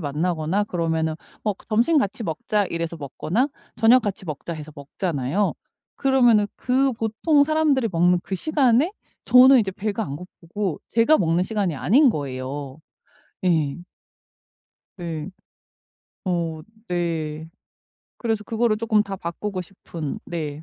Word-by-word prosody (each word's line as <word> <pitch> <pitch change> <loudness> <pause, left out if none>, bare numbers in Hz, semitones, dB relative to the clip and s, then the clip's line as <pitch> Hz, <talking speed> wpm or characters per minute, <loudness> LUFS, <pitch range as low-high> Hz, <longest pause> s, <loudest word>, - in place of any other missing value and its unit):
만나거나 160 +5 -1
그러면은 160 -4 -1 0.3
어 210 - +2 0.2
"점심 235 +9 +3
같이 220 -4 0
먹자." 205 +5 0
이래서 170 -1 -3
먹거나 160 - -1 0.3
"저녁 235 +2 +5
같이 195 -3 -4
먹자." 155 +1 -5
해서 155 -1 -8
먹잖아요. 145 +4 -2 0.4
그러면은 245 -6 +4
그 265 +2 +2
보통 230 +7 +2
사람들이 300 -5 +2
먹는 175 +1 +4
그 195 - -3
시간에 280 - +2 0.3
저는 255 +1 +8
이제 200 -3 -1
배가 210 +3 -3
안 140 -7 -5
고프고 180 +1 -5
제가 230 +7 +4
먹는 170 +1 +2
시간이 195 -6 -1
아닌 260 - +5
거예요. 135 - -5 0.7
예. 160 -6 +2 1.2
예. 165 0 -4 0.9
어. 170 -3 -1 0.3
네. 160 -3 -2 0.7
그래서 225 -3 -1
그거를 225 0 +1
조금 220 -2 +2
다 195 -1 -6
바꾸고 185 +2 -4
싶은. 170 -4 -7
네. 155 -3 -5
185 Hz, 265 characters per minute, -23 LUFS, 160-225 Hz, 1.2 s, 저는